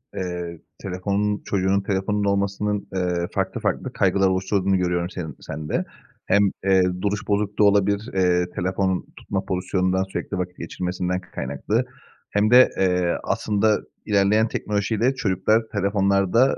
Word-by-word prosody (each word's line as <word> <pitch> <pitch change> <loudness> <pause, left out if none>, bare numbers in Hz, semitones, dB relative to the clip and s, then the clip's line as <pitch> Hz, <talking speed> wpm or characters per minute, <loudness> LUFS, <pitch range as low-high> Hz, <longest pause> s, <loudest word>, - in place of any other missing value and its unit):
Eee, 90 -2 -4 0.2
telefonun 100 +2 -1
Çocuğunun 95 0 +1
telefonunun 100 +1 -1
olmasının, 100 +1 0
eee, 90 -2 0
farklı - - -2
farklı - - -2
kaygılar 95 0 +2
oluşturduğunu 95 +1 +1
görüyorum 90 -1 0
senin 80 -6 -6
sende. 75 +1 -3 0.4
Hem, 100 0 +3
eee, 95 -1 +5 0.2
duruş 105 +1 -2
bozukluğu 105 0 +1
olabilir, 100 +1 +2
eee, 90 -2 +2
telefonun 95 0 0
tutma 95 -1 -3
pozisyonundan, 95 0 0
sürekli 95 0 -5
vakit 90 0 -4
geçirmesinden 90 +2 -3
kaynaklı 65 +1 -1 0.4
hem 105 +2 +1
de, 125 +1 +8
eee, 90 -2 +2
aslında 105 0 +1 0.3
ilerleyen 105 +2 +3
teknolojiyle 110 +4 0
çocuklar 105 0 +2
telefonlarda, 100 +4 +2
95 Hz, 125 wpm, -23 LUFS, 90-100 Hz, 0.4 s, de